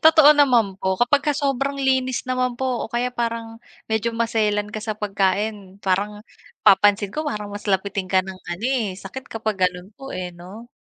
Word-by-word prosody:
Totoo 315 -2 +8
naman 245 -9 +4
po. 190 0 0
Kapagka-sobrang 280 +1 +1
linis 260 -1 +1
naman 255 -1 0
po 260 -2 -1
o - - -20
kaya 240 +1 0
parang 230 -1 -3 0.3
medyo 220 +1 +1
maselan 215 -3 0
ka 215 - -4
sa 215 -1 -3
pagkain 200 0 -1
parang 200 +2 0 0.4
napapansin 205 +1 +5
ko 310 0 -2
parang 210 -7 -3
mas 205 +1 -7
lapitin 195 0 0
ka 190 -1 +4
ng 190 0 -8
ano, 175 +6 -4
eh, 235 -8 0
sakit 265 +7 -8
kapag 215 -4 0
ganon 180 +1 -6
po, 270 0 -9
eh, 180 -1 -4
no? 185 +7 -12
220 Hz, 170 wpm, -22 LUFS, 195-255 Hz, 0.4 s, Totoo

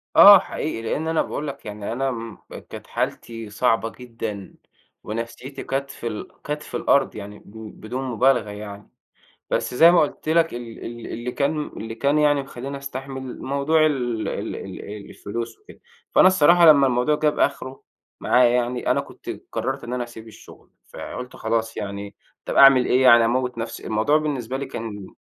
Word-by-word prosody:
آه 200 -1 +11
حقيقي، 150 -9 -4
لأن 145 +8 -2
أنا 160 0 +2
باقول 150 - -4
لك 140 - -7
يعني 105 0 -6
أنا 135 +2 -1
امم 115 -3 -6 0.3
كانت - - -9
حالتي 115 -2 -4
صعبة 115 +1 +1
جدًا، 115 -6 -7 0.5
ونفْسيتي 115 +5 -6
كانت 135 0 -3
في 120 - -6
ال 105 -2 -5 0.2
كانت 150 +1 -3
في - - -5
الأرض 140 -1 +2
يعني 105 0 -8
ب 110 +1 -12
بدون 125 +5 -4
مبالغة 125 -2 +2
يعني. 105 0 -9 0.6
بس - - -1
زي 165 +7 +8
ما 175 - +5
قُلت 150 +1 -2
لك 165 -1 +2
ال 120 -2 -8
ال 120 -1 -7
اللي 120 +2 -5
كان 140 +2 +1
م 150 - -2
اللي 115 0 -6
كان 140 +6 +1
يعني 145 -2 +3
مخلّيني 135 +1 -7
أستحمل 135 -1 -7
موضوع 145 +3 +2
ال 120 -6 -1
ال - - -4
ال - - -8
إيه 105 +1 -7
الفلوس 115 +3 -6
وكده. 420 - -17 0.3
فأنا - - +6
الصراحة 175 -1 +5
لما 145 -3 +7
الموضوع 125 +4 +2
جاب 150 -1 +1
آخره 130 +1 -1 0.4
معايا 125 -1 +4
يعني، 125 0 0
أنا 135 +3 +3
كنت 140 - -10 0.2
قرّرت 135 +3 -3
إن 120 - -6
أنا 125 -1 -1
اسيب 115 -2 -12
الشغل، 110 - -16 0.2
فقُلت 125 0 -7
خلاص 115 0 -2
يعني 100 0 -6 0.3
طَب - - -4
أعمل 135 -2 +7
إيه 130 +1 +3
يعني 120 -2 +7
أموّت 125 +1 0
نفْسي؟ 115 0 -6
الموضوع 110 +8 +2
بالنسبة 135 -5 -3
لي 140 +1 -4
كان 105 -6 -7
125 Hz, 180 wpm, -23 LUFS, 115-140 Hz, 0.6 s, آه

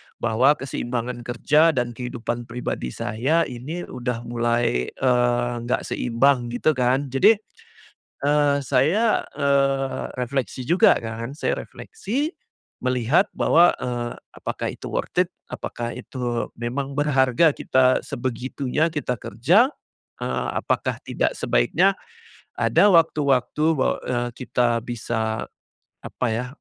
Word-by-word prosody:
bahwa 120 +5 +3
keseimbangan 120 -3 -4
kerja 150 +7 +3
dan 120 -1 0
kehidupan 120 -1 -5
pribadi 115 - -4
saya 130 - 0
ini 145 +9 -6
udah 125 -2 -4
mulai, 120 - 0
eee, 120 -1 +1 0.2
nggak 125 - 0
seimbang, 125 +1 +1
gitu 120 +6 +1
kan. 130 0 0
Jadi, 135 - +5 0.9
eee, 145 -1 +3
saya, 155 - +2 0.2
eee, 140 -1 +1 0.2
refleksi 125 0 -3
juga 175 +4 +5
kan, 115 +2 -5
saya 150 - -1
refleksi 310 - -4 0.5
melihat 130 - +2
bahwa, 175 +2 +4
eee, 120 -1 -3 0.2
apakah - - -4
itu - - -7
worth - - +1
it? - - -15 0.2
Apakah 120 0 -5
itu 120 -1 -4
memang 130 +4 -3
berharga 140 +1 +3
kita 130 0 +2
sebegitunya 130 +5 -2
kita 145 -5 -2
kerja? 180 - +2 0.5
Eee, - - -2
apakah - - -1
tidak - - -1
sebaiknya, 195 +2 +2 0.6
ada 205 - +4
waktu-waktu 150 -4 +2
bahwa, 140 -5 +1
eee, 120 -1 -1
kita 120 -3 0
bisa, 110 -2 -3 0.6
apa 125 - -2
ya 115 +3 -1
125 Hz, 115 wpm, -23 LUFS, 120-145 Hz, 0.9 s, Jadi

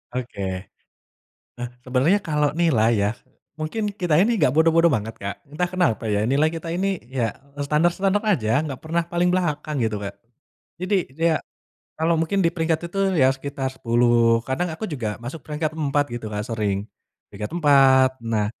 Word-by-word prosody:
Oke, 125 -5 -5 1.2
eh, 120 0 -4 0.2
sebenarnya 135 +11 +2
kalau 150 -5 0
nilai 135 -9 +3
ya, 100 +1 +2 0.5
mungkin 155 +8 -3 0.2
kita 175 -4 +2
ini 230 +4 +3
gak 130 - +3
bodoh-bodoh 165 +1 +4
banget 110 -1 -2
Kak, 100 0 -4
entah 155 +5 -1
kenapa 140 -12 +1
ya 105 -1 +1
nilai 145 +4 +3
kita 165 0 -6
ini 195 0 -1
ya 120 -5 -1 0.3
standar-standar 175 +7 +2
aja 120 - +2
gak 135 - -4
pernah 170 +2 0
paling 175 +1 +1
belakang 150 -5 -1
gitu 110 -2 0
Kak, 100 - -5 0.7
jadi 190 +2 +1 0.2
ya, 165 0 +2 0.6
kalau 165 +1 +2
mungkin 195 +5 0
diperingkat 165 -1 0
itu 195 - -5 0.2
ya 130 0 +6
sekitar 135 -1 -4
10 115 -1 +3
kadang 155 +7 0
aku 220 - -6
juga 115 -7 -3
masuk 135 +6 -6
peringkat 155 0 -2
4 145 -1 +1
gitu 115 -2 -5
Kak, 105 - -2
sering, 105 -3 0 0.5
peringkat 105 +1 -6
4 135 -4 +6
nah, 110 -2 0
145 Hz, 160 wpm, -23 LUFS, 120-165 Hz, 1.2 s, ya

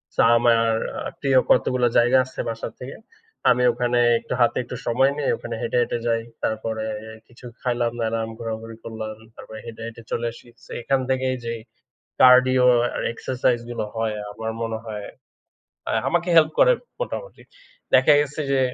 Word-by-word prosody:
So - - -8 0.2
আমার 115 -1 +3 0.4
আ - - -4
প্রিয় 135 -2 +2
কতগুলো 125 -1 +3
জায়গা 120 +2 +5
আছে 130 - -13
বাসার 115 -1 -5
থেকে। 130 +2 -7 0.5
আমি 125 0 +3
ওখানে 120 0 0 0.2
একটু - - -6
হাতে 120 - +3
একটু 125 - -7
সময় 130 +4 +3
নেই 145 - -1
ওখানে 120 - -6
হেঁটে, 120 +1 -1
হেঁটে 120 - -1
যাই। 115 -1 +1 0.2
তারপরে 110 0 -2 0.4
কিছু 120 +1 -16 0.2
খাইলাম-দাইলাম, 115 -2 -1
ঘোরাঘুরি 115 0 -6
করলাম 110 -1 -6 0.2
তারপরে 110 0 -10
হেঁটে, 115 -1 -9
হেঁটে 115 0 -10
চলে 120 - -1
আসি। 120 - -16 0.2
সো - - -15
এখান 135 +2 +1
থেকেই 130 0 0
যেই 115 -1 -3 0.6
কার্ডিও 130 0 +6 0.3
আর - - -2
এক্সারসাইজ 125 0 0
গুলো 120 - -3
হয়, 110 -1 -1 0.2
আমার 110 +1 -5
মনে 115 -1 -2
হয় 105 -2 -6 0.8
আ - - 0 0.2
আমাকে 175 +1 0
হেল্প 155 -1 +5
করে - - +7 0.3
মোটামুটি। - - -5 0.5
দেখা 130 +4 +6
গেছে 150 +1 -3
যে, 135 - +3
120 Hz, 160 wpm, -23 LUFS, 115-130 Hz, 0.8 s, করে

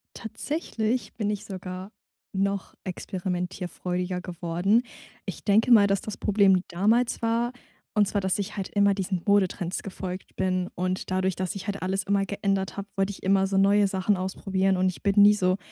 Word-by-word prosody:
Tatsächlich 225 -4 -3
bin 210 -3 -1
ich 210 0 -3
sogar 185 -1 -7 0.4
noch 195 0 -1
experimentierfreudiger 180 -1 -3
geworden. 180 +5 0 0.4
Ich - - -6
denke 220 +4 +3
mal, 205 -4 +8
dass 195 -1 +1
das 215 - -6
Problem 195 -3 +4
damals 220 +7 +1
war 230 +1 +1 0.4
und 210 -1 +4
zwar, 200 +1 0
dass 190 +1 0
ich 200 +1 -4
halt 195 - -3
immer 200 -1 +3
diesen 190 -2 -2
Modetrends 190 -3 +1
gefolgt 185 -1 -6
bin 185 -1 0
und 185 +1 -2
dadurch, 185 -1 +1
dass 185 -1 -2
ich 195 +2 -7
halt 200 -1 -3
alles 190 +1 0
immer 200 0 +1
geändert 195 -1 -1
habe, 200 0 -5
wollte 195 +1 +1
ich - - -11
immer 195 0 +3
so 195 0 0
neue 200 +1 +5
Sachen 190 +1 +1
ausprobieren 190 0 0
und 185 0 +2
ich 185 - -8
bin 200 -1 +3
nie 205 +1 +8
so 185 -2 +1
195 Hz, 175 wpm, -26 LUFS, 185-205 Hz, 0.4 s, mal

